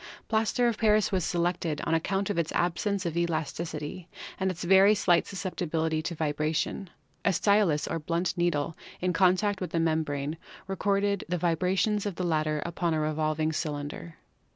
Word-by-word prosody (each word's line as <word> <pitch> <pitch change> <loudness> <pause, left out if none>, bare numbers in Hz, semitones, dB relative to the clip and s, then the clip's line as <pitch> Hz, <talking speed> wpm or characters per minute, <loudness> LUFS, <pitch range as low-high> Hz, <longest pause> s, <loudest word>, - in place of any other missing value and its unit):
Plaster 225 +2 +2
of 230 -2 -1
Paris 215 -2 +3
was 185 -3 +1
selected 170 -3 -1
on - - -1
ac 165 - +3
count 195 +1 0
of* 190 - -1
its 165 - -1
absence 185 +3 0
of 170 -1 -2
elasticity 165 0 -3 0.3
and 190 0 +1
its 180 -1 -5
very 190 +3 +6
slight 175 -3 +3
sus 195 - -6
ceptibility 160 -4 -1
tc 170 +2 -4
vibration. 155 +4 -1 0.3
A 200 - +3
stylus 200 -6 +2
or - - -2
blunt 170 +4 -1
needle 165 -3 0 0.2
in 180 0 0
con 185 +1 +5
tact 205 0 -1
with 180 - -2
the 165 - -1
membrane 155 -2 -1 0.3
recorded 200 +1 0
the 180 - 0
vibrations 185 +5 +1
of 200 - -4
the 180 - -2
latter 155 -2 0
upon 170 -1 -1
a - - 0
revolving 155 +1 0
cylinder. 150 +1 -4
170 Hz, 175 wpm, -28 LUFS, 155-190 Hz, 0.3 s, very